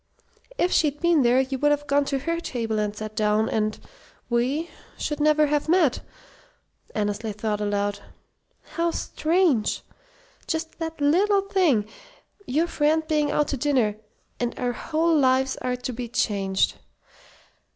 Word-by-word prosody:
"If 360 Hz, -, +1 dB
she'd 295 Hz, -2 st, +2 dB
been 340 Hz, -3 st, +3 dB
there, 245 Hz, +1 st, +4 dB
you 265 Hz, 0 st, -3 dB
would 295 Hz, -, +3 dB
have 290 Hz, 0 st, +1 dB
gone 285 Hz, 0 st, +2 dB
to 275 Hz, -, -1 dB
her 335 Hz, +5 st, -2 dB
table 225 Hz, -8 st, -2 dB
and 210 Hz, 0 st, -1 dB
sat 215 Hz, 0 st, -7 dB
down, 215 Hz, +1 st, +2 dB
and 215 Hz, -1 st, -1 dB, 0.5 s
we 265 Hz, +8 st, 0 dB, 0.3 s
should 295 Hz, -1 st, -3 dB
never 305 Hz, 0 st, +4 dB
have 295 Hz, +1 st, 0 dB
met!" 330 Hz, -7 st, +3 dB, 1.0 s
Annesley 210 Hz, +1 st, -1 dB
thought 210 Hz, 0 st, -2 dB
aloud. 205 Hz, 0 st, -1 dB, 0.7 s
"How 335 Hz, 0 st, 0 dB
strange! 325 Hz, -, +1 dB, 0.6 s
Just 320 Hz, 0 st, -3 dB
that 325 Hz, -1 st, -5 dB
little 385 Hz, +8 st, +3 dB
thing 350 Hz, -, +2 dB, 0.6 s
your 305 Hz, +6 st, +1 dB
friend 315 Hz, -1 st, +1 dB
being 300 Hz, -2 st, +1 dB
out 295 Hz, 0 st, +1 dB
to 280 Hz, -, -2 dB
dinner 255 Hz, -7 st, +1 dB, 0.4 s
and 240 Hz, -1 st, -2 dB
our 245 Hz, -1 st, -1 dB
whole 325 Hz, +5 st, 0 dB
lives 265 Hz, -2 st, +3 dB
are 250 Hz, 0 st, -2 dB
to 250 Hz, 0 st, -5 dB
be 240 Hz, +1 st, -5 dB
changed. 195 Hz, -4 st, 0 dB
275 Hz, 145 wpm, -24 LUFS, 220-315 Hz, 1.0 s, there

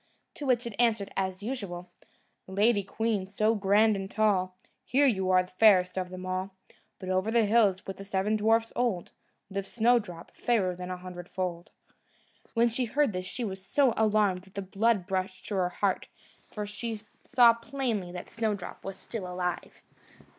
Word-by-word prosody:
To 290 Hz, -, -6 dB
which 245 Hz, -1 st, +2 dB
it 235 Hz, -, -5 dB
answered, 225 Hz, -4 st, +2 dB
as 190 Hz, 0 st, -2 dB
usual: 185 Hz, -7 st, -5 dB, 0.6 s
"Lady 205 Hz, +3 st, +3 dB
queen, 210 Hz, -1 st, -1 dB
so 215 Hz, +3 st, +1 dB
grand 210 Hz, +1 st, +3 dB
and 195 Hz, 0 st, -4 dB
tall, 190 Hz, -4 st, +1 dB, 0.3 s
Here, 280 Hz, +3 st, +3 dB
you 190 Hz, -8 st, +2 dB
are 185 Hz, 0 st, +4 dB
fairest 185 Hz, -1 st, +4 dB
of 185 Hz, -1 st, -2 dB
them 185 Hz, 0 st, -7 dB
all; 185 Hz, +1 st, -3 dB, 0.4 s
But 185 Hz, -, -7 dB
over 185 Hz, +3 st, +1 dB
the 230 Hz, -1 st, +3 dB
hills, 205 Hz, -3 st, +3 dB
with 195 Hz, -, -6 dB
the 195 Hz, -, -8 dB
seven 195 Hz, +2 st, 0 dB
dwarfs 225 Hz, +2 st, +2 dB
old, 230 Hz, -8 st, -1 dB, 0.4 s
Lives 195 Hz, 0 st, -4 dB
Snowdrop, 220 Hz, -7 st, +1 dB
fairer 215 Hz, -7 st, +1 dB
a 180 Hz, 0 st, -5 dB
hundredfold." 180 Hz, -1 st, -5 dB, 0.9 s
When 235 Hz, +1 st, +4 dB
she 245 Hz, +2 st, -1 dB
heard 275 Hz, 0 st, +1 dB
this, 185 Hz, 0 st, -4 dB
she 245 Hz, +5 st, -4 dB
was 190 Hz, -3 st, -5 dB
so 260 Hz, +5 st, +3 dB
alarmed 210 Hz, -4 st, +2 dB
that 190 Hz, +1 st, -18 dB
all 200 Hz, -, -2 dB
the -, -, -15 dB
blood 205 Hz, -3 st, +2 dB
rushed 185 Hz, 0 st, -2 dB
to 205 Hz, -, -2 dB
her 180 Hz, -1 st, +1 dB
heart, -, -, -1 dB, 0.4 s
for 210 Hz, -1 st, -5 dB
she 215 Hz, +1 st, -5 dB, 0.2 s
saw 245 Hz, -3 st, +6 dB
plainly 230 Hz, -6 st, -3 dB
that 180 Hz, -, -7 dB
Snowdrop 215 Hz, -4 st, -3 dB
was 195 Hz, 0 st, -6 dB
still 190 Hz, -6 st, -6 dB
alive. 180 Hz, -1 st, -4 dB
200 Hz, 170 wpm, -29 LUFS, 185-225 Hz, 0.9 s, saw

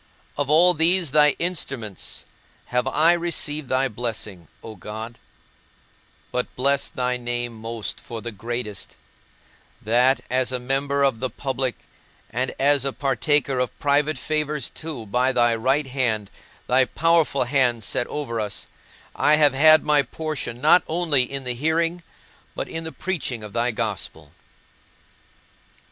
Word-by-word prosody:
Of 145 Hz, -1 st, -2 dB
all 170 Hz, +4 st, +6 dB
these 170 Hz, -1 st, +3 dB
thy 150 Hz, -1 st, +5 dB
instruments 135 Hz, -, -3 dB, 0.5 s
have 125 Hz, +1 st, +1 dB
I 155 Hz, +5 st, +4 dB
received 155 Hz, -4 st, -2 dB
thy 130 Hz, +1 st, +2 dB
blessing, 110 Hz, -6 st, -5 dB, 0.2 s
O 110 Hz, -1 st, -8 dB
God; 110 Hz, +4 st, -8 dB, 1.1 s
but 125 Hz, -, -1 dB
bless 140 Hz, +2 st, +1 dB
thy 125 Hz, -4 st, -1 dB
name 120 Hz, -1 st, -3 dB
most 115 Hz, 0 st, -5 dB
for 115 Hz, -, -7 dB
the 115 Hz, +1 st, -6 dB
greatest; 115 Hz, 0 st, -5 dB, 0.8 s
that, 125 Hz, +5 st, +3 dB
as 130 Hz, 0 st, 0 dB
a 130 Hz, -, 0 dB
member 135 Hz, +3 st, 0 dB
of 135 Hz, -5 st, +2 dB
the 130 Hz, +1 st, -1 dB
public, 130 Hz, -2 st, -2 dB, 0.6 s
and 125 Hz, +3 st, -1 dB
as 140 Hz, 0 st, +4 dB
a 135 Hz, -, 0 dB
partaker 135 Hz, 0 st, +1 dB
of 125 Hz, -1 st, -2 dB
private 145 Hz, +2 st, +1 dB
favours 150 Hz, -3 st, -2 dB
too, 150 Hz, -8 st, -6 dB
by 125 Hz, +5 st, +1 dB
thy 120 Hz, -2 st, +3 dB
right 135 Hz, +6 st, +1 dB
hand, 120 Hz, -6 st, -1 dB, 0.3 s
thy 130 Hz, +1 st, +4 dB
powerful 165 Hz, -1 st, +2 dB
hand 125 Hz, -3 st, +1 dB
set 120 Hz, -, -1 dB
over 115 Hz, -7 st, -3 dB
us, 105 Hz, -2 st, -4 dB, 0.5 s
I 150 Hz, -, +4 dB
have 150 Hz, -3 st, +4 dB
had 155 Hz, +3 st, +6 dB
my 150 Hz, -1 st, +4 dB
portion 140 Hz, -3 st, -5 dB
not 155 Hz, +6 st, +6 dB
only 155 Hz, -7 st, +1 dB
in 135 Hz, -1 st, -4 dB
the 125 Hz, -1 st, -2 dB
hearing, 165 Hz, +6 st, 0 dB, 0.5 s
but -, -, -3 dB
in 165 Hz, 0 st, -6 dB
the 160 Hz, -, -5 dB
preaching 135 Hz, -13 st, -3 dB
of 105 Hz, -1 st, -9 dB
thy 120 Hz, +1 st, +1 dB
Gospel. 105 Hz, -9 st, -4 dB
130 Hz, 145 wpm, -23 LUFS, 120-150 Hz, 1.1 s, all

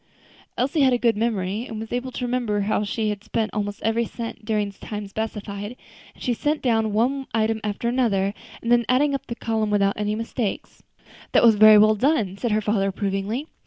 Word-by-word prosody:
Elsie 280 Hz, +5 st, +1 dB
had 260 Hz, -2 st, +5 dB
a -, -, +3 dB
good 235 Hz, -2 st, +2 dB
memory, 210 Hz, 0 st, -1 dB
and 220 Hz, -2 st, -6 dB
was 225 Hz, +1 st, -6 dB
able 250 Hz, +1 st, -2 dB
to 250 Hz, -, -4 dB
remember 240 Hz, -4 st, 0 dB
how 205 Hz, +1 st, 0 dB
she 215 Hz, +1 st, -1 dB
had 210 Hz, -1 st, -4 dB
spent 220 Hz, 0 st, -2 dB
almost 205 Hz, -1 st, -3 dB
every 225 Hz, +1 st, +1 dB
cent 230 Hz, -1 st, -7 dB
during 210 Hz, -2 st, -1 dB
the 195 Hz, -, -24 dB
time 210 Hz, -1 st, -6 dB
specified; 205 Hz, +1 st, -5 dB, 0.4 s
and -, -, -12 dB
she 245 Hz, -, +1 dB
set 295 Hz, +6 st, -1 dB
down 225 Hz, -3 st, +1 dB
one 260 Hz, +6 st, 0 dB
item 220 Hz, 0 st, +1 dB
after 210 Hz, +2 st, -2 dB
another, 205 Hz, -6 st, +1 dB, 0.3 s
and 230 Hz, -, -1 dB
then 240 Hz, 0 st, +5 dB
added 280 Hz, +3 st, +3 dB
up 275 Hz, 0 st, -4 dB
the 235 Hz, -, -4 dB
column 220 Hz, -2 st, -1 dB
without 200 Hz, -1 st, +2 dB
any 210 Hz, 0 st, -1 dB
mistake. 225 Hz, -1 st, -3 dB, 0.7 s
"That -, -, +5 dB
was 230 Hz, -2 st, +7 dB
very 215 Hz, 0 st, +8 dB
well 215 Hz, +1 st, +6 dB
done," 220 Hz, -4 st, +1 dB
said 240 Hz, -, -1 dB
her 215 Hz, +1 st, +2 dB
father 205 Hz, -1 st, +1 dB
approvingly. 195 Hz, +6 st, -2 dB
220 Hz, 205 wpm, -23 LUFS, 205-240 Hz, 0.7 s, very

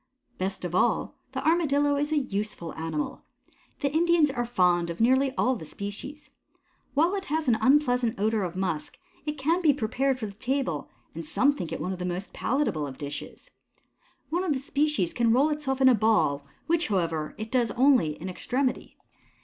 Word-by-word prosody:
Best 190 Hz, 0 st, -3 dB
of 175 Hz, -, -4 dB
all, -, -, +1 dB, 0.2 s
the -, -, -2 dB
Armadillo 290 Hz, -4 st, +3 dB
is 295 Hz, +2 st, -1 dB
a 310 Hz, -, +2 dB
useful 210 Hz, -, -3 dB
animal. 160 Hz, -2 st, -4 dB, 0.6 s
The 280 Hz, 0 st, 0 dB
Indians 330 Hz, -2 st, +4 dB
are 240 Hz, -3 st, -2 dB
fond 180 Hz, -6 st, +2 dB
of 170 Hz, -, -5 dB
nearly 260 Hz, +4 st, +3 dB
all 255 Hz, +1 st, +2 dB
the 175 Hz, -, -8 dB
species. 205 Hz, -, -7 dB, 0.6 s
While 330 Hz, +6 st, +3 dB
it 390 Hz, -1 st, -3 dB
has 315 Hz, -2 st, -1 dB
an 225 Hz, -3 st, +3 dB
unpleasant 250 Hz, -4 st, +3 dB
odor 215 Hz, +1 st, +1 dB
of 180 Hz, -1 st, -4 dB
musk, 180 Hz, -5 st, -3 dB, 0.3 s
it 300 Hz, 0 st, -2 dB
can 325 Hz, +7 st, +1 dB
be 310 Hz, -4 st, +5 dB
prepared 265 Hz, +2 st, 0 dB
for 235 Hz, -, -4 dB
the 205 Hz, -, -6 dB
table; 230 Hz, -, -2 dB, 0.2 s
and 165 Hz, -, -6 dB
some 260 Hz, -, +2 dB
think 175 Hz, -, -6 dB
it -, -, -3 dB
one 185 Hz, -, -2 dB
of 185 Hz, -, -7 dB
the 180 Hz, -, -3 dB
most 180 Hz, +2 st, -4 dB
palatable 240 Hz, -, 0 dB
of 130 Hz, -1 st, -9 dB
dishes. 145 Hz, 0 st, -7 dB, 0.8 s
One 350 Hz, +3 st, 0 dB
of 345 Hz, -5 st, +1 dB
the 265 Hz, -, -2 dB
species 280 Hz, -, 0 dB
can 230 Hz, -2 st, +3 dB
roll 275 Hz, +5 st, +4 dB
itself 275 Hz, -3 st, -2 dB
into 260 Hz, -1 st, +7 dB
a -, -, +4 dB
ball, 200 Hz, -10 st, +2 dB, 0.2 s
which, 335 Hz, +1 st, +1 dB
however, 165 Hz, -6 st, -1 dB
it 220 Hz, 0 st, -6 dB
does 245 Hz, -3 st, +2 dB
only 240 Hz, -, +3 dB
in 180 Hz, -, -6 dB
extremity. 250 Hz, +8 st, -2 dB
245 Hz, 190 wpm, -27 LUFS, 180-285 Hz, 0.8 s, into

